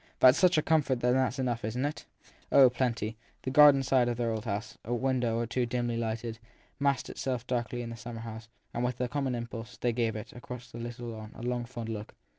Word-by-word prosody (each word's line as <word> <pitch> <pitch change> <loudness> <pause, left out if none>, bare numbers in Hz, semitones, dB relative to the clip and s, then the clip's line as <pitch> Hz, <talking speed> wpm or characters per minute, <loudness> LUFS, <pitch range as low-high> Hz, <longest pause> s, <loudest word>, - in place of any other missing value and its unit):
That 130 - +9
s 125 - +3
such 180 -2 +5
a 155 - +3
comfort 145 -6 +2
that 125 0 +3
it - - +3
s 130 0 +1
enough, 120 -3 -1
isn 115 +5 -2
t - - +3
it? 150 - -9 0.5
Oh, 130 -3 +8
plenty! 115 -3 -1 0.3
The 130 - -2
garden 145 -1 +8
side 130 -2 +3
of 120 - -2
their 120 -1 0
old 110 0 -3
house, 105 +1 -3
a 120 - -1
window 125 -2 +1
or 120 - 0
two 120 +1 -1
dimly 120 -1 -1
lighted, 115 0 -3 0.4
massed 140 -2 +1
itself 125 -3 -3
darkly 120 -1 -2
in 115 - -6
the - - -5
summer 115 0 -7
night, 115 0 -7 0.3
and, 120 - -1
with 125 0 -1
a 125 - +1
common 135 -1 -1
impulse, 120 0 -6
they 120 -1 0
gave 115 -2 0
it, 105 - -7
across 125 0 -9
the 115 - -8
little 120 0 -5
lawn, 110 -1 -8
a - - -9
long, 120 0 -1
fond 120 -2 -6
look. 110 -1 -6
120 Hz, 240 wpm, -30 LUFS, 115-130 Hz, 0.5 s, That